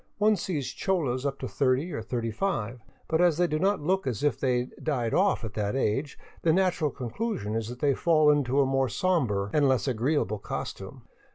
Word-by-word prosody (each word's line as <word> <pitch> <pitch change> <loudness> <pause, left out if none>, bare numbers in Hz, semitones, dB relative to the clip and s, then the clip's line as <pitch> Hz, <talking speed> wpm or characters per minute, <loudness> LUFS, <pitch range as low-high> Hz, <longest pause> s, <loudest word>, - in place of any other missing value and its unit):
One 215 +1 +4
sees 150 -9 -3
cholas 145 -9 -1
up 140 0 -3
to - - -3
thirty 140 +5 0
or 115 - -3
thirty 115 0 -3
five, 120 - -2 0.3
but 160 +1 +1
as 175 -3 +4
they 175 - +3
do 155 -2 -1
not 195 +1 +1
look 190 0 0
as 120 -1 -2
if 145 - +1
they 125 -2 +1
died 125 -7 -1
off 190 -9 +2
at 110 -3 -5
that 105 0 -2
age, 135 +3 -1 0.2
the 165 - +3
natural 180 -3 +2
conclusion 125 - -4
is 110 -1 -2
that 125 0 -9
they 145 -2 +3
fall 155 +1 +4
into 140 -2 +1
a - - +3
more 135 -1 +1
somber 120 - 0
and 145 -2 +3
less 130 +1 +1
agree 130 +4 0
able 105 -5 -1
costume. - - -6
140 Hz, 205 wpm, -27 LUFS, 120-170 Hz, 0.3 s, One